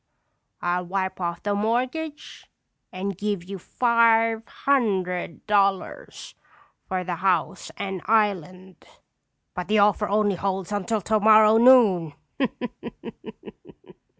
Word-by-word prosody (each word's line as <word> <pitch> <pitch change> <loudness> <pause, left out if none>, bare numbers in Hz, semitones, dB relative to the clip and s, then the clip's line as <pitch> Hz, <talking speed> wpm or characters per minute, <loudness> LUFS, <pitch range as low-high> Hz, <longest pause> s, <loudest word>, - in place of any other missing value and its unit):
I'll 180 +1 -1
wipe 190 0 -3
off 170 -1 -4
the 205 - -1
mortgage 255 +9 -3 0.4
and 195 +1 -4
give 205 -1 -3
you 195 +1 -8
five 230 +1 +2 0.2
hundred 190 -11 -1
dollars 200 - -1 0.5
for 185 -1 -2
the 175 -1 -4
house 185 -2 -1
and 190 -2 -5
island. 190 -4 -1 0.7
But 180 -1 -5
the 215 +2 +1
offer 205 0 +2
only 205 -2 +1
holds 195 0 -3
until 205 +2 -2
tomorrow 215 +1 +4
noon." 220 - +5
200 Hz, 100 wpm, -24 LUFS, 185-220 Hz, 0.7 s, noon